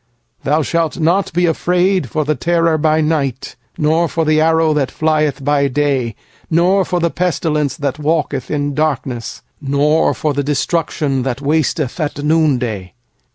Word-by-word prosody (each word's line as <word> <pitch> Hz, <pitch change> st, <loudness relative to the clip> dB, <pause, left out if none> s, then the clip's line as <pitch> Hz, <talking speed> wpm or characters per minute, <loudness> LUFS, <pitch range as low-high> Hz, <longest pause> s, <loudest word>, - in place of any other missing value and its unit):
shalt 165 Hz, 0 st, -1 dB
not 175 Hz, +5 st, +1 dB
be 175 Hz, +2 st, +1 dB
afraid 180 Hz, -1 st, +1 dB
of 155 Hz, -1 st, +1 dB
the 155 Hz, -, +1 dB
terror 165 Hz, +3 st, +1 dB
by 155 Hz, 0 st, +2 dB
night, 145 Hz, -5 st, -1 dB, 0.2 s
Nor 160 Hz, +3 st, +2 dB
of 165 Hz, -, +2 dB
the 155 Hz, 0 st, +3 dB
arrow 160 Hz, 0 st, +3 dB
that 145 Hz, -3 st, 0 dB
flieth 155 Hz, -2 st, 0 dB
by 145 Hz, -1 st, +2 dB
day; 135 Hz, -4 st, 0 dB, 0.4 s
60f 180 Hz, +2 st, +2 dB
the 170 Hz, -1 st, +1 dB
pestilence 155 Hz, -6 st, -1 dB
that 145 Hz, 0 st, -3 dB
walketh 150 Hz, -3 st, -1 dB
in 145 Hz, -1 st, -1 dB
darkness, 135 Hz, -6 st, -2 dB, 0.2 s
Nor 145 Hz, +3 st, +2 dB
of 150 Hz, -3 st, +1 dB
the 145 Hz, -, 0 dB
destruction 145 Hz, -1 st, -1 dB
that 130 Hz, 0 st, -2 dB
wasteth 150 Hz, 0 st, -1 dB
at 145 Hz, -2 st, -3 dB
noonday. 125 Hz, -, 0 dB
150 Hz, 145 wpm, -17 LUFS, 140-165 Hz, 0.4 s, the